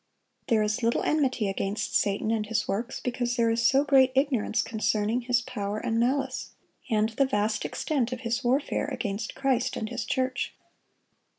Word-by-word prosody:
There 225 Hz, -4 st, +3 dB
is 210 Hz, +3 st, -1 dB
little 230 Hz, 0 st, +1 dB
enmity 260 Hz, -8 st, +1 dB
against 195 Hz, +1 st, -2 dB
Satan 205 Hz, +2 st, +1 dB
and 215 Hz, -2 st, -1 dB
his 225 Hz, 0 st, -1 dB
works, 230 Hz, +7 st, -2 dB
because 245 Hz, -1 st, -2 dB
there 230 Hz, -2 st, +2 dB
is 230 Hz, +1 st, +1 dB
so 270 Hz, +4 st, +4 dB
great 270 Hz, -2 st, +5 dB
ignorance 255 Hz, -6 st, +1 dB
concerning 220 Hz, +1 st, 0 dB
his 245 Hz, 0 st, +1 dB
power 205 Hz, -4 st, -4 dB
and 225 Hz, +1 st, -1 dB
malice, 265 Hz, +4 st, -1 dB, 0.4 s
and 215 Hz, -1 st, +2 dB
the 270 Hz, +5 st, +1 dB
vast 210 Hz, -3 st, 0 dB
extent 260 Hz, -6 st, -1 dB
of 250 Hz, -1 st, -4 dB
his 235 Hz, +2 st, -1 dB
warfare 270 Hz, +4 st, +1 dB
against 215 Hz, -6 st, -4 dB
Christ 265 Hz, -3 st, 0 dB
and 220 Hz, -, -3 dB
His 240 Hz, -2 st, -3 dB
church. 255 Hz, +2 st, -1 dB
235 Hz, 170 wpm, -27 LUFS, 215-260 Hz, 0.4 s, great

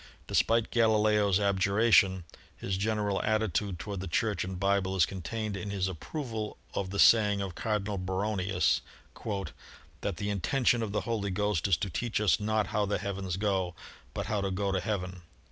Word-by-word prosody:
Despite 115 Hz, -1 st, +2 dB
Galileo's 105 Hz, -3 st, +3 dB
abjuration, 100 Hz, -1 st, +3 dB, 0.3 s
his 95 Hz, -, -2 dB
general 105 Hz, 0 st, 0 dB
attitude 105 Hz, -3 st, 0 dB
toward 100 Hz, +1 st, -5 dB
the 95 Hz, -, -5 dB
Church 100 Hz, +2 st, 0 dB
and 95 Hz, -, -5 dB
the -, -, -5 dB
Bible 100 Hz, 0 st, +1 dB
is 90 Hz, -4 st, +5 dB
contained 105 Hz, +4 st, -4 dB
in 95 Hz, +1 st, -5 dB
his 95 Hz, -2 st, -1 dB
approval 110 Hz, -, -5 dB, 0.2 s
of 95 Hz, -1 st, -2 dB
the 100 Hz, -, -4 dB
saying 105 Hz, -2 st, +5 dB
of 95 Hz, -2 st, -3 dB
Cardinal 105 Hz, 0 st, -2 dB
Baronius, 95 Hz, -4 st, 0 dB, 1.2 s
"That 100 Hz, -4 st, -3 dB
the 100 Hz, +2 st, -2 dB
intention 120 Hz, -, +1 dB
of 110 Hz, -3 st, -2 dB
the 105 Hz, -, 0 dB
Holy 110 Hz, -4 st, -2 dB
Ghost 105 Hz, -1 st, 0 dB
is 95 Hz, -5 st, +3 dB
to 100 Hz, -, -3 dB
teach 115 Hz, +6 st, -1 dB
us 105 Hz, 0 st, +3 dB
not 110 Hz, 0 st, +1 dB
how 105 Hz, -1 st, +1 dB
the 105 Hz, -, 0 dB
heavens 95 Hz, -2 st, -3 dB
go, 95 Hz, -4 st, 0 dB, 0.4 s
but -, -, -2 dB
how 105 Hz, -2 st, -1 dB
to 100 Hz, -, -1 dB
go 100 Hz, +1 st, -1 dB
to 95 Hz, -, +1 dB
heaven." 90 Hz, -2 st, -3 dB
100 Hz, 175 wpm, -30 LUFS, 95-105 Hz, 1.2 s, is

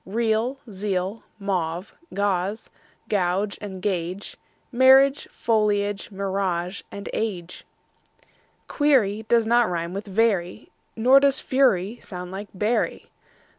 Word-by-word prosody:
Real, 225 Hz, +5 st, 0 dB
zeal; 195 Hz, +1 st, -2 dB, 0.2 s
mauve, 185 Hz, -3 st, -3 dB, 0.2 s
gauze 200 Hz, +1 st, -1 dB, 0.4 s
and 195 Hz, 0 st, -1 dB
gauge; 185 Hz, 0 st, -3 dB, 0.4 s
Marriage, 265 Hz, +2 st, +5 dB
foliage, 205 Hz, -2 st, 0 dB
mirage, 190 Hz, -2 st, -2 dB, 0.3 s
age. 180 Hz, -6 st, -4 dB, 1.0 s
Query 220 Hz, -8 st, +2 dB
does 230 Hz, -1 st, +4 dB
not 235 Hz, -1 st, +3 dB
rime 170 Hz, 0 st, -3 dB
with 200 Hz, +2 st, -5 dB
very, 200 Hz, -2 st, 0 dB, 0.2 s
Nor 255 Hz, +4 st, +6 dB
does 275 Hz, -1 st, +3 dB
fury 235 Hz, -5 st, +1 dB
sound 180 Hz, -1 st, -8 dB
like 200 Hz, +2 st, -6 dB
bury. 210 Hz, +5 st, -1 dB
205 Hz, 95 wpm, -24 LUFS, 185-230 Hz, 1.0 s, Nor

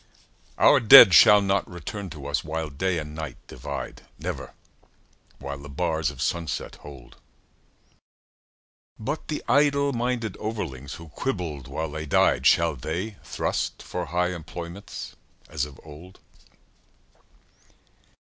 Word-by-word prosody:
Our -, -, +6 dB
dead 115 Hz, -4 st, +10 dB
shall 105 Hz, +4 st, +8 dB
not 100 Hz, -1 st, 0 dB
return 95 Hz, +3 st, -7 dB
to 75 Hz, -5 st, -10 dB
us 70 Hz, 0 st, -1 dB
while 80 Hz, 0 st, -4 dB
Day 90 Hz, +5 st, -1 dB
and 75 Hz, -1 st, -5 dB
Night 80 Hz, 0 st, -6 dB
divide 70 Hz, +3 st, -7 dB, 0.2 s
Never -, -, -6 dB, 0.8 s
while 70 Hz, +1 st, -7 dB
the 70 Hz, +1 st, -11 dB
bars 80 Hz, +1 st, -1 dB
of -, -, -5 dB
sunset 85 Hz, -2 st, -3 dB
hold. 70 Hz, -4 st, -13 dB, 1.8 s
But 140 Hz, +8 st, -4 dB
the 150 Hz, -, -4 dB
idle 140 Hz, -1 st, +3 dB
minded 120 Hz, -4 st, -2 dB
overlings 80 Hz, -, -5 dB
who 85 Hz, -1 st, -12 dB
quibbled 80 Hz, -, -4 dB
while 80 Hz, -1 st, -4 dB
they 80 Hz, 0 st, -6 dB
died, 65 Hz, -2 st, +3 dB
Shall 85 Hz, -2 st, +4 dB
they 90 Hz, -, -4 dB
thrust -, -, -3 dB
for -, -, -4 dB
high 90 Hz, +1 st, 0 dB
employments 85 Hz, +3 st, -8 dB, 0.3 s
as 75 Hz, -2 st, -2 dB
of 70 Hz, -2 st, -13 dB
old? 80 Hz, +5 st, -13 dB
85 Hz, 125 wpm, -25 LUFS, 75-100 Hz, 1.8 s, dead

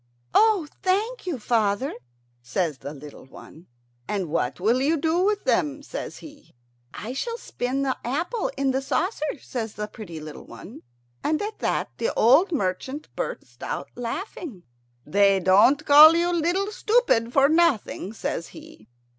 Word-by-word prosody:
"Oh, 425 Hz, -7 st, +4 dB
thank 415 Hz, +5 st, -1 dB
you, 335 Hz, -7 st, -1 dB
father," 225 Hz, +2 st, 0 dB, 0.5 s
says 150 Hz, +3 st, -2 dB
the 140 Hz, -, -7 dB
little 145 Hz, -1 st, -11 dB
one. 160 Hz, +5 st, -14 dB, 0.4 s
"And 195 Hz, -5 st, -2 dB
what 150 Hz, -4 st, -1 dB
will 230 Hz, +7 st, +2 dB
you 310 Hz, +4 st, +2 dB
do 320 Hz, +3 st, +1 dB
with 405 Hz, +2 st, +1 dB
them?" 290 Hz, -1 st, 0 dB
says -, -, -6 dB
he. 290 Hz, -, -15 dB, 0.4 s
"I 220 Hz, +6 st, -6 dB
shall 465 Hz, -, -3 dB
spin 270 Hz, -, -3 dB
the 265 Hz, -1 st, 0 dB
apple 330 Hz, -, -2 dB
in 275 Hz, -1 st, +1 dB
the 265 Hz, +1 st, -1 dB
saucer," 315 Hz, +2 st, -2 dB
says 225 Hz, -5 st, -5 dB
the 210 Hz, -, -4 dB
little 210 Hz, -, -6 dB
pretty 170 Hz, -8 st, -8 dB
one, 155 Hz, +7 st, -11 dB, 0.4 s
and 310 Hz, +1 st, +1 dB
at 425 Hz, +1 st, -5 dB
that -, -, -1 dB
the 480 Hz, -, 0 dB
old 280 Hz, -, +5 dB
merchant 260 Hz, -, -3 dB
burst -, -, -6 dB
out -, -, -5 dB
laughing. 245 Hz, -, -6 dB, 0.4 s
"They 195 Hz, +4 st, +3 dB
don't 205 Hz, -, +4 dB
call 305 Hz, +3 st, +9 dB
you 345 Hz, +1 st, +1 dB
'Little 350 Hz, +5 st, 0 dB
Stupid' 435 Hz, -, +2 dB
for 275 Hz, +1 st, +5 dB
nothing," 310 Hz, -, +1 dB
says 170 Hz, -6 st, -4 dB
he. 110 Hz, -, -14 dB
275 Hz, 155 wpm, -24 LUFS, -, 0.5 s, call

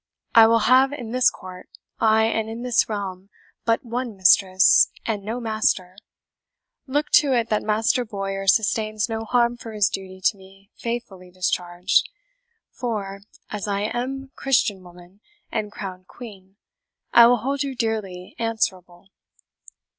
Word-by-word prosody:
I 225 Hz, -1 st, +8 dB
will 230 Hz, 0 st, +3 dB
have 260 Hz, +2 st, +5 dB
in 240 Hz, -6 st, -7 dB
this 250 Hz, 0 st, +4 dB
court, 185 Hz, -1 st, -12 dB, 0.3 s
ay, 220 Hz, 0 st, +4 dB
and 220 Hz, 0 st, -1 dB
in 230 Hz, +2 st, -6 dB
this 245 Hz, -2 st, +1 dB
realm, 195 Hz, -2 st, -5 dB, 0.4 s
but 230 Hz, +2 st, +1 dB
one 235 Hz, -2 st, -4 dB
mistress, 190 Hz, 0 st, +5 dB, 0.2 s
and 215 Hz, -3 st, -2 dB
no 225 Hz, +4 st, -4 dB
master. 215 Hz, -5 st, -1 dB, 0.9 s
Look 290 Hz, +3 st, -1 dB
to 280 Hz, -3 st, 0 dB
it 235 Hz, -2 st, 0 dB
that 215 Hz, -, +1 dB
Master 220 Hz, +4 st, +1 dB
Bowyer 195 Hz, -3 st, -5 dB
sustains 215 Hz, +1 st, +1 dB
no 225 Hz, 0 st, -4 dB
harm 240 Hz, 0 st, +1 dB
for 225 Hz, -2 st, -9 dB
his 205 Hz, -2 st, +2 dB
duty 190 Hz, -1 st, -7 dB
to 205 Hz, -, +3 dB
me 195 Hz, +2 st, -19 dB
faithfully 230 Hz, -6 st, -6 dB
discharged; 180 Hz, 0 st, 0 dB, 0.6 s
for, 205 Hz, -5 st, -5 dB, 0.3 s
as 210 Hz, -1 st, -4 dB
I 200 Hz, 0 st, -1 dB
am 260 Hz, +5 st, -4 dB
Christian 250 Hz, -8 st, +1 dB
woman 180 Hz, +2 st, -16 dB, 0.3 s
and 215 Hz, -2 st, -3 dB
crowned 185 Hz, -3 st, -8 dB
Queen, 195 Hz, -5 st, -12 dB, 0.6 s
I 235 Hz, 0 st, +9 dB
will 245 Hz, +1 st, +4 dB
hold 275 Hz, +5 st, -3 dB
you 275 Hz, -2 st, -3 dB
dearly 210 Hz, -6 st, -4 dB
answerable. 190 Hz, -6 st, -3 dB
215 Hz, 145 wpm, -23 LUFS, 195-235 Hz, 0.9 s, I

